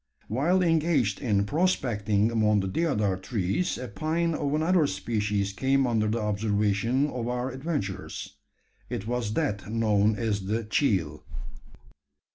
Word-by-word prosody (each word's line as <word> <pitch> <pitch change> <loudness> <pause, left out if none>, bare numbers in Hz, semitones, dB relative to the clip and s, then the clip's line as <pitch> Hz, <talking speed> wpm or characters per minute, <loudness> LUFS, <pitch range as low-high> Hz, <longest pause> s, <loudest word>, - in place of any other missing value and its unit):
While 170 - +2
engaged 160 - +2
in 105 -6 +1
"prospecting" 110 - +1
among 105 -2 +3
the 95 - -2
deodar 105 - 0
trees, 100 - -1
a 125 - -5
pine 160 +9 -1
of 145 -1 -1
another 160 0 +3
species 100 -1 -1
came 135 +5 +2
under 110 -3 +1
the 110 +2 0
observation 105 +4 +1
of 120 -2 -3
our 125 +1 -2
adventurers. 125 - -4 0.5
It 100 - -4
was 120 -2 -2
that 105 -11 -1
known 110 -2 +2
as 105 -4 -2
the 110 +3 -1
"cheel." 100 - 0
115 Hz, 130 wpm, -27 LUFS, 100-140 Hz, 0.5 s, among